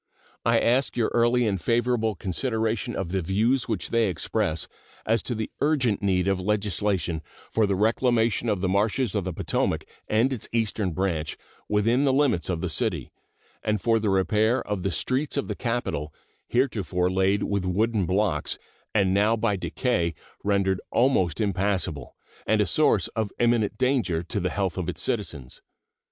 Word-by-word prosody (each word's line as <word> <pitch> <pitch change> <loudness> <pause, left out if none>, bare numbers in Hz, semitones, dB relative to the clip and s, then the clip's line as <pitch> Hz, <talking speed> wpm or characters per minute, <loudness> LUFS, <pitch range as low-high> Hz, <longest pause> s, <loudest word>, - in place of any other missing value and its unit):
I - - +3
ask 125 +3 +1
your 115 - +2
early 120 +1 +3
and 95 -4 -1
favorable 115 -2 +1
consideration 110 +3 -2
of 95 -3 -3
the 95 +1 -1
views 110 +9 +1
which 110 -6 -3
they 115 -2 +3
express 80 -1 -1 0.4
as 115 +1 +2
to 120 - -4
the 110 0 -4
urgent 135 -8 +2
need 95 -2 +1
of 95 -1 +1
legislation 100 -4 0 0.3
for 110 -2 +2
the 100 - +1
reclamation 115 +2 +2
of 100 -4 0
the 95 - +1
marshes 105 +4 +1
of 100 -3 -1
the 95 - -2
Potomac 80 - -1 0.2
and 115 +5 +2
its 120 - -5
Eastern 110 -3 0
Branch 80 -4 -2 0.3
within 115 +6 +2
the 135 -2 +3
limits 130 -12 +2
of 85 -3 -1
the 90 - -1
city, 85 - -1 0.5
and 105 -1 0
for 115 +2 +2
the 105 -1 0
repair 105 +5 +2
of 105 -2 -2
the 95 - 0
streets 135 - -1
of 140 - -1
the - - -2
capital, 115 - -2 0.4
heretofore 95 -8 0
laid 95 +2 +2
with 100 -2 -1
wooden 100 +1 +1
blocks 95 -5 0 0.4
and 95 -3 +3
now 105 +3 +3
by 110 -2 +1
decay 90 - -1 0.3
rendered 100 -2 +1
almost 105 - +2
impassable 95 - -1 0.3
and - - +3
a - - +4
source - - +2
of 110 -3 -2
imminent 115 -3 +2
danger 125 -10 +1
to 100 +5 -3
the 90 -1 0
health 95 -2 -2
of 85 - -2
its - - -4
citizens. 65 -3 -3
105 Hz, 170 wpm, -26 LUFS, 95-115 Hz, 0.5 s, a